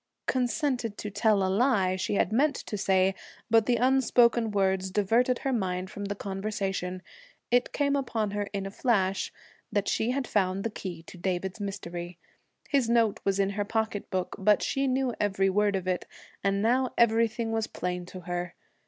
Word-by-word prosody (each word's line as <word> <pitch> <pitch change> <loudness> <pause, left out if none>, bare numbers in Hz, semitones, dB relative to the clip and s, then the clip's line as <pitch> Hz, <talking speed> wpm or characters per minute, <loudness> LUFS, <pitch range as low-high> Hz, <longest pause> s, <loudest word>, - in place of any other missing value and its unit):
'Consented 250 -3 0
to 210 - -5
tell 210 -1 +2
a - - +2
lie' 195 -2 +2
she 190 +2 -1
had 200 - +1
meant 285 +4 +3
to 215 - -5
say, 190 -1 +2 0.4
but 225 -1 +5
the 245 - +4
unspoken 240 -2 +3
words 190 -2 +1
diverted 230 +6 +2
her 270 - -2
mind 185 -4 -2
from 205 - -5
the 200 0 -3
conversation. 195 -2 -3 0.5
It 245 0 +3
came 285 -1 +1
upon 230 -6 -1
her 205 0 -2
in 200 -1 -3
a 195 - -5
flash 195 -5 +1 0.4
that 205 -1 0
she 220 - +1
had 260 +1 0
found 195 -3 0
the 230 - -2
key 175 -5 -6
to 180 - -12
David's 185 +2 -2
mystery. 175 -3 -5 0.5
His 270 -5 +1
note 230 -3 +3
was 195 0 +1
in 195 0 +2
her 205 +1 -1
pocketbook, 205 -4 -2
but 210 +2 +4
she 275 0 0
knew 260 -1 +1
every 195 -2 +2
word 205 +1 +2
of 185 -1 -3
it, 185 -1 -1 0.4
and 200 +1 +1
now 255 +3 +2
everything 230 0 +2
was 225 -1 0
plain 180 0 -4
to 185 0 -9
her. 175 0 -4
205 Hz, 180 wpm, -28 LUFS, 190-235 Hz, 0.5 s, but